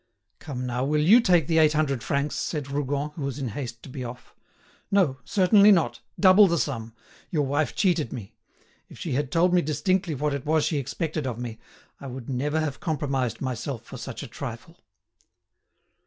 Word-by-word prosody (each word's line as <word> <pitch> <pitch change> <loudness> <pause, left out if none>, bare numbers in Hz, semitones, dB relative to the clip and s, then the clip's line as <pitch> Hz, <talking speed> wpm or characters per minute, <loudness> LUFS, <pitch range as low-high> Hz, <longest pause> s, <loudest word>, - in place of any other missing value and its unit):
"Come 125 -3 -5
now, 125 0 -2
will 150 +2 +1
you 220 +10 +7
take 175 -8 +4
the 160 +1 +2
eight 155 -1 +5
hundred 140 -5 0
francs?" 140 +3 -1
said 145 -4 -3
Rougon, 145 +1 -2
who 150 - -9
was 140 -1 -3
in 135 -4 -3
haste 120 0 -6
to - - -10
be 130 0 -6
off. 125 0 -9 0.6
"No, 175 -10 +2
certainly 200 +2 +5
not; 175 -5 +2 0.2
double 195 +1 +7
the 170 -1 +1
sum. 115 -5 -3 0.3
Your 150 -4 0
wife 145 +3 0
cheated 170 - +1
me. 110 -7 -8 0.6
If - - -13
she - - -5
had 135 +1 -1
told 175 +2 +3
me 180 - +5
distinctly 175 +3 0
what 145 +2 -1
it 140 -2 -3
was 155 0 +2
she 150 - 0
expected 155 +2 -3
of 120 -3 -3
me, 120 -2 -6 0.4
I 140 - -8
would 130 0 -7
never 145 +5 0
have 150 -3 -3
compromised 135 -6 -2
myself 130 -1 -4
for 130 - -10
such 120 +1 -7
a - - -7
trifle." 135 +7 -8
145 Hz, 190 wpm, -26 LUFS, 130-160 Hz, 0.6 s, you